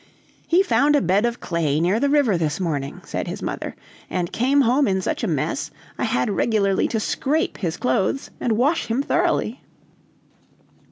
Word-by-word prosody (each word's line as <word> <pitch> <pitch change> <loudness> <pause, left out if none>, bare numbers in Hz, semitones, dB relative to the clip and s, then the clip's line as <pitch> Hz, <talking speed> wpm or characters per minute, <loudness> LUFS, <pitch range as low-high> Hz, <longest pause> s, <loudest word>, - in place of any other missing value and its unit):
"He 355 +3 +4
found 295 -5 +3
a - - +5
bed 195 +6 +2
of 235 0 -4
clay 155 -4 0
near 180 +6 +2
the 280 - +2
river 280 -8 +3
this 155 -2 -1
morning," 145 -6 -3
said - - -4
his - - -5
mother, - - -4 0.3
"and 175 -2 -2
came 270 +4 +3
home 265 +2 +3
in 190 -1 +1
such 190 - -2
a - - +1
mess, 155 -7 -1 0.3
I - - +1
had 125 +11 0
regularly 200 -2 +1
to 225 - -1
scrape 295 +8 -1
his 170 -6 -2
clothes 190 - 0
and 225 -3 0
wash 290 +8 +1
him 235 +5 0
thoroughly!" - - 0
215 Hz, 175 wpm, -22 LUFS, 170-275 Hz, 0.3 s, a